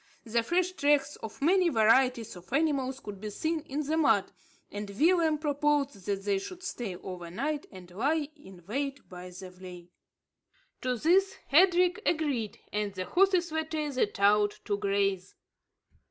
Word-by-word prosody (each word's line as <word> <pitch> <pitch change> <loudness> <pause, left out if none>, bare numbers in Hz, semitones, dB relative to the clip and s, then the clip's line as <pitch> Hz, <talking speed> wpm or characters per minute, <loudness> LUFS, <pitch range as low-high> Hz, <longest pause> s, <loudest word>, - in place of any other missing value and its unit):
The 230 +1 +1
fresh 355 +9 +1
tracks 290 -4 +2
of 220 +5 -8
many 360 +2 +4
varieties 235 - +3
of 180 +4 -14
animals 270 -3 0
could 205 -6 -9
be 215 - -4
seen 315 +10 -2
in 295 -1 -4
the 315 +3 0
mud; 250 -11 +3 0.4
and 205 0 -5
Willem 320 - +3
proposed 290 - 0
that 200 -1 -1
they 200 -1 +1
should 360 - -9
stay 235 - -4
over 175 -1 -8
night 285 - -3
and 180 -2 -12
lie 290 - 0
in 190 - -15
wait 275 +6 -4
by 180 0 -9
the 180 +1 -10
vley. 180 -1 -11 0.9
To 250 -1 -1
this 385 - +3
Hendrik 360 +4 +4
agreed; 260 - -1 0.2
and 210 -1 -1
the 185 0 -3
horses 365 - +2
were 320 0 0
tethered 295 -9 -2
out 205 +1 +3
to 205 - 0
graze. 195 -2 -1
260 Hz, 155 wpm, -29 LUFS, 200-315 Hz, 0.9 s, many